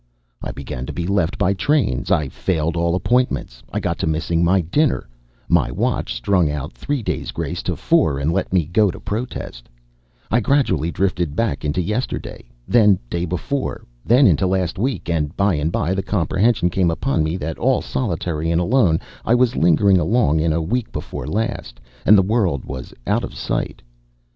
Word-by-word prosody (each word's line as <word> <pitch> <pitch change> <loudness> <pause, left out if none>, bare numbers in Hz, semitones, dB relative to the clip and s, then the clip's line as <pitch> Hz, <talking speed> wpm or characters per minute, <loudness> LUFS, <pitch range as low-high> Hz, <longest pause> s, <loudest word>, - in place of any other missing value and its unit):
I - - -4
began 65 -2 -6
to - - -5
be 85 - -3
left 95 -2 0
by 95 - +2
trains, 130 - 0
I 75 - +2
failed 80 +2 -1
all 85 0 +1
appointments, 105 - 0
I - - -1
got - - -2
to - - -1
missing 80 +2 0
my 90 +2 +3
dinner; 140 - 0 0.4
my - - +3
watch - - -1
strung 85 +5 +2
out 75 +2 -4
three 145 -5 -3
days' - - -3
grace - - -4
to - - -2
four 70 - +2
and 70 +4 0
let 95 - -1
me 90 -4 +2
go 100 +6 +2
to - - -6
protest; 100 - -5 0.6
I 115 - +4
gradually 105 - +1
drifted 85 -5 -1
back 80 -10 -1
into 75 +5 0
yesterday, 105 +8 -3 0.2
then 105 -5 +5
day 85 0 -1
before, 90 - -3 0.2
then 125 +5 +5
into 95 - +4
last 90 -1 -1
week, 130 +5 -2
and 80 -3 -1
by 100 -1 +3
and 75 +1 -1
by 85 +2 0
the 95 - -1
comprehension 95 +1 +1
came 90 -1 +2
upon 85 - 0
me 80 +3 -1
that 80 -2 -5
all 130 +1 +2
solitary 85 -7 -2
and 85 0 +2
alone 90 -3 +3 0.2
I 115 - +3
was 125 -1 +2
lingering 90 +3 +4
along 85 -3 +2
in 80 0 0
week 125 +3 -1
before 60 - -6
last, 105 - -3 0.3
and 105 - +8
the 95 - +5
world 95 - 0
was 65 -1 -7
out - - +1
of - - -6
sight. - - -3
90 Hz, 180 wpm, -20 LUFS, 80-110 Hz, 0.6 s, and